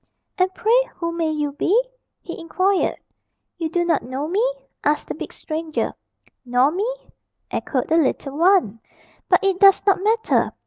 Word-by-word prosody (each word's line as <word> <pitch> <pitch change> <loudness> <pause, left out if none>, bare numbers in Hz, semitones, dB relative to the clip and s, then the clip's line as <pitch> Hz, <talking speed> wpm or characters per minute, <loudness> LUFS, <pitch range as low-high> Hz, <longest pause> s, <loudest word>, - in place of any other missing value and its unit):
"And 370 0 +3
pray - - +2
who 335 -1 -3
may 335 -1 -1
you 300 -2 -1
be?" 355 +10 +2 0.4
he 345 - -7
inquired. 370 +3 +1 0.6
"You 325 -2 -2
do 345 +1 0
not 340 - +2
know 260 +4 -4
me?" 390 +7 +1 0.4
asked 295 +1 +1
the - - -2
big - - -7
stranger. 315 0 -3 0.5
"Nor 250 +3 +2
me?" 405 +8 -1 0.6
echoed 255 -4 -2
the 325 - +3
little 280 -2 0
one. 335 - +3 0.5
"But - - +4
it 385 -2 +1
does 395 -1 +6
not 390 -2 +3
matter. 445 +2 +1
335 Hz, 155 wpm, -21 LUFS, 300-390 Hz, 0.6 s, does